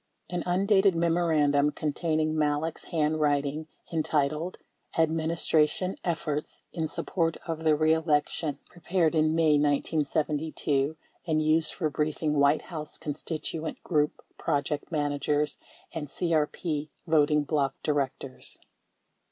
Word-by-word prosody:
An 175 -1 -1
undated 195 +1 +4
memorandum 160 -4 +3
containing 155 +1 0
Malek's 150 +1 0
handwriting 150 -1 0 0.2
en 165 -2 +1
titled 155 +3 0 0.4
"Administration 160 +2 +2
Efforts 155 -3 -2
In 160 -2 -1
Support 165 0 -1
Of 160 -1 -4
The 155 -2 +4
Be 155 +1 +3
election" 150 -2 0
pre 175 - -18
pared 170 -1 +2
in 155 0 +3
May 155 -3 +4
1972, 150 0 0 0.3
and 155 -1 +2
used 155 0 +2
for 155 -5 -1
briefing 150 +1 0
White 140 +2 +4
House 155 -2 -6
constituent 155 +1 -4
group 150 -3 0 0.2
project 145 +3 -1
managers 145 0 0 0.3
and 155 -4 -4
CEP 155 -1 -1 0.2
voting 150 -2 +3
bloc 140 -2 0
directors. 135 -2 -2
155 Hz, 110 wpm, -28 LUFS, 150-165 Hz, 0.4 s, undated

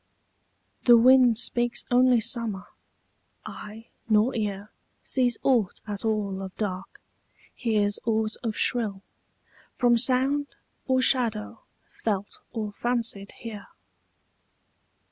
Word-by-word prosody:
The 240 -1 +8
wind 250 -1 +6
speaks 240 0 +1
only 250 0 +5
summer: 225 -4 -1 0.8
eye 220 +2 -9 0.2
nor 215 +4 +3
ear 205 -2 -3 0.3
Sees 245 -3 +1
aught 235 -8 +1
at 205 -2 -5
all 210 -3 -1
of 190 -1 -8
dark, 190 -3 -5 0.5
hears 210 -3 0
aught 220 -1 0
of 225 -3 -3
shrill, 210 -6 0 0.7
From 240 -2 +3
sound 270 +4 +2 0.4
or 260 -1 +2
shadow 230 -4 +1 0.2
felt 205 -2 -4
or 215 -3 -4
fancied 230 -3 -2
here. 215 -4 -9
225 Hz, 105 wpm, -26 LUFS, 210-245 Hz, 0.8 s, The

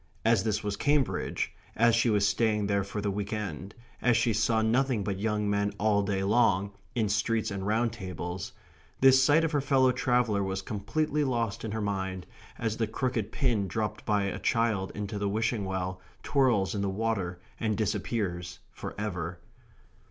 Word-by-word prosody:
As 115 -3 +4
this 105 -2 0
was 105 -1 -2
Cambridge, 145 +4 0 0.2
as 115 +1 +4
she 115 +1 +3
was 105 -2 +3
staying 105 -2 +1
there 100 0 +1
for 100 +2 -4
the 100 -1 -1
week 100 +1 -3
end, 100 -2 -4 0.3
as 120 -2 +4
she 115 - +2
saw 110 +1 +2
nothing 120 -1 +2
but 95 -1 -3
young 105 0 0
men 100 0 0
all 105 -1 +3
day 100 -1 -1
long, 100 -2 +3 0.2
in 110 -3 +1
streets 110 +2 0
and 100 0 -3
round 115 +2 +1
tables, 90 -3 -5 0.5
this 130 0 +7
sight 150 +4 +5
of 165 - 0
her 145 -2 +1
fellow 130 -2 +4
traveller 125 -4 +1
was 95 0 -2
completely 150 +10 -1
lost 115 -6 -1
in 110 - -3
her 110 +1 -2
mind, 95 -2 -2 0.3
as 110 -1 -2
the 110 - 0
crooked 115 -2 -2
pin 120 -9 +1
dropped 105 +3 -3
by 105 -2 +1
a 100 - -2
child 115 -5 +1
into 105 0 -4
the 100 0 0
wishing 110 0 0
well 95 -1 -3 0.2
twirls 125 -9 +2
in 100 - -2
the 100 - 0
water 95 -4 -2 0.2
and 110 -2 0
disappears 100 -4 -2
for - - -7
ever. 90 -5 -3
105 Hz, 180 wpm, -29 LUFS, 100-115 Hz, 0.5 s, this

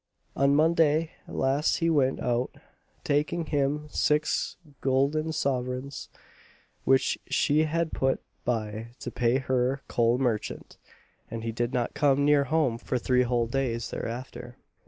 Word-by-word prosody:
On 140 +1 +3
Monday 160 0 +3 0.2
last 140 +3 +1
he 165 - 0
went 140 -5 +2
out, 125 +1 -1 0.5
taking 150 +4 0
with 160 - -6
him 145 +1 0
six 150 0 +1 0.2
goolden 140 +4 +1
sovereigns, 130 -2 -2 0.8
which 135 0 +3
she 150 +2 +2
had 165 +1 -1
put 135 0 +1 0.2
by 110 -2 -2
to - - -5
pay 120 +1 +2
her 130 0 0
coal 120 0 +2
merchant, 120 -5 -2 0.5
and 115 -1 -5
he 115 - -2
did 120 +2 -2
not 120 -3 -1
come 140 0 +3
near 145 -1 +4
home 135 -5 +1
for 125 - -2
three 125 +1 +2
whole 120 -1 +1
days 120 -1 -2
thereafter. 120 +1 -6
135 Hz, 135 wpm, -27 LUFS, 125-150 Hz, 0.8 s, near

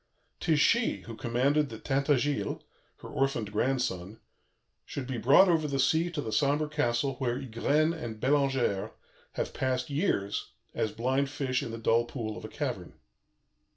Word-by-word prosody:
'Tis 160 -3 +2
she 230 +9 +3
who 115 - -9
commanded 135 +5 +1
that 110 -2 -9
Tintagiles, 140 0 0 0.4
her - - -8
orphaned 130 -6 -1
grandson, 110 -4 -1 0.6
should 140 - -5
be 125 -2 -3
brought 140 +12 +6
over 160 -3 +2
the 140 -1 -1
sea 160 +5 +2
to 160 -3 -3
the 110 - -4
sombre 145 +4 +2
castle 135 -3 0
where 125 -2 -1
Ygraine 140 +5 +1
and 120 -9 -6
Bellangère 135 -6 +1 0.4
have - - -3
passed 130 0 -1
years, 140 - -1 0.2
as 110 - -1
blind 130 +5 0
fish 135 -3 -1
in - - -5
the 115 - -5
dull 115 +1 +2
pool 115 -4 -5
of - - -9
a - - -5
cavern. - - -4
135 Hz, 155 wpm, -29 LUFS, 115-145 Hz, 0.6 s, brought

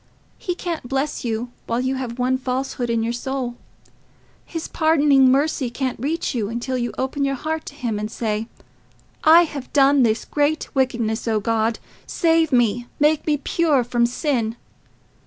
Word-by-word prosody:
He 355 - -3
can't 335 -9 -5
bless 275 +2 -1
you 235 +1 -3 0.2
while 230 - 0
you 260 +1 0
have 255 -3 -4
one 255 +1 +1
falsehood 255 -1 -2
in 230 -1 +1
your 230 +1 -1
soul; 255 0 -3 0.9
his 330 -2 -6
pardoning 285 -4 +4
mercy 275 -2 +1
can't 255 0 -3
reach 305 +7 -2
you 220 -5 -1
until 240 +3 -3
you 240 -1 -1
open 265 +2 -1
your 275 0 0
heart 315 +3 -4
to 285 - -8
him, 235 -7 -2
and 210 0 -3
say, 220 -1 -2 0.8
'I 330 +2 +8
have 285 -5 -6
done 280 0 +5
this 225 -2 +2
great 295 +1 0
wickedness; 235 -4 0
O 220 -1 +2
God, 225 +1 0 0.3
save 325 -2 +2
me, 240 -1 +2
make 300 +1 +2
me 300 -1 +2
pure 290 -2 +1
from 235 0 +1
sin. 240 -4 -1
260 Hz, 165 wpm, -22 LUFS, 235-290 Hz, 0.9 s, I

